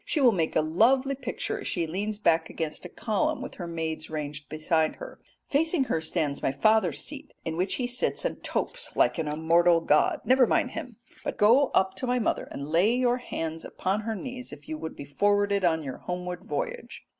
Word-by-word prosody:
She 310 - -1
will 255 -4 +6
make 165 -6 -1
a - - +5
lovely 245 - +3
picture 255 -2 -4
as - - -6
she 170 -3 -1
leans 205 +6 -3
back 165 -5 +2
against 160 +1 -4
a - - -6
column 300 - -1
with - - -6
her 175 - -4
maids 160 -2 -4
ranged 150 -2 -5
behind 155 0 +1
her. - - -10 0.3
Facing 320 +1 +2
her 165 -10 -1
stands 155 -3 -1
my - - +1
father's 190 +3 +3
seat 295 0 -7
in 160 - -2
which 185 +3 0
he 250 - -1
sits 245 0 -1
and - - -3
topes - - -2
like - - +3
an 160 - -1
immortal 165 +3 +4
god. 150 -2 +2
Never 255 -1 +5
mind 255 - +1
him, 250 -9 -7 0.3
but - - -3
go 240 +7 +5
up 190 0 +3
to 260 - -3
my 250 0 +2
mother 230 - 0
and 140 +1 -6
lay 190 +8 +4
your 250 -1 +2
hands 165 -9 -4
upon 195 +3 -2
her 220 +1 -3
knees, 250 +4 -7
if 145 0 -12
you 155 - -3
would 160 +1 -6
be 140 - -8
forwarded 200 +5 +2
on 160 -3 +2
your 135 -3 -5
homeward 180 0 -5
voyage." 145 -1 -4
180 Hz, 210 wpm, -27 LUFS, 160-245 Hz, 0.3 s, will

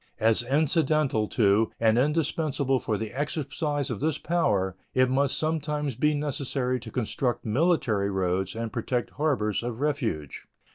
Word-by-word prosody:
As 110 0 +3
incidental 150 -3 +2
to 105 0 +3
and 110 -1 +4
indispensable 145 -1 +1
for 110 -4 -1
the 110 0 -4
exercise 145 0 -2
of 115 - -3
this 155 +1 0
power, 100 - 0 0.2
it 130 0 +4
must 140 +1 +2
sometimes 150 -2 -1
be 150 +5 +2
necessary 135 -3 -1
to 115 -1 -9
construct 120 +1 -2
military 115 - +1
roads 95 +1 -1
and 115 -1 -4
protect 120 0 -2
harbors 130 -9 0
of 120 -1 -4
refuge. 125 - -2
130 Hz, 140 wpm, -27 LUFS, 110-150 Hz, 0.2 s, and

